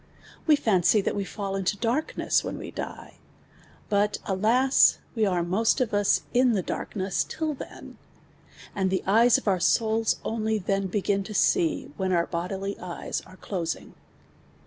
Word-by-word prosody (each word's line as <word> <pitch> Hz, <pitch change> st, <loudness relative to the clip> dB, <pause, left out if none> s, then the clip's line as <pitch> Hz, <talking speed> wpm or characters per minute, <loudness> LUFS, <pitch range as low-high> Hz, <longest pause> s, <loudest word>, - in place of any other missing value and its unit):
We 305 Hz, -, +7 dB
fancy 210 Hz, -, +3 dB
that -, -, -2 dB
we 200 Hz, -, -1 dB
fall 195 Hz, 0 st, -5 dB
into 195 Hz, +1 st, -1 dB
darkness, 240 Hz, +8 st, 0 dB
when -, -, -4 dB
we -, -, -7 dB
die; -, -, -8 dB, 0.7 s
but 205 Hz, 0 st, +1 dB
alas, 230 Hz, +8 st, +4 dB, 0.2 s
we 220 Hz, -3 st, +1 dB
arc 175 Hz, -3 st, 0 dB
nujst 200 Hz, +6 st, +2 dB
of 250 Hz, -5 st, -1 dB
us 205 Hz, -1 st, +2 dB
in 250 Hz, -1 st, +4 dB
the 195 Hz, -4 st, 0 dB
daik 190 Hz, +1 st, -2 dB
till 315 Hz, -1 st, -2 dB
then; 275 Hz, -, -10 dB, 0.7 s
and 190 Hz, -1 st, 0 dB
the 190 Hz, -, -1 dB
eyes 230 Hz, +5 st, +5 dB
of -, -, -8 dB
our 190 Hz, -2 st, +2 dB
souls 220 Hz, +4 st, +2 dB
oidy 220 Hz, -3 st, -1 dB
then 195 Hz, -1 st, 0 dB
bei; 195 Hz, +1 st, -2 dB
in 200 Hz, -1 st, +2 dB
to 215 Hz, -, -7 dB
see, 165 Hz, -6 st, +1 dB
when 190 Hz, 0 st, -1 dB
our 170 Hz, -2 st, +2 dB
bodily 190 Hz, +3 st, -4 dB
eyes 175 Hz, -1 st, -5 dB
are 185 Hz, -, -15 dB
closing 170 Hz, -5 st, -4 dB
200 Hz, 165 wpm, -26 LUFS, 190-225 Hz, 0.7 s, We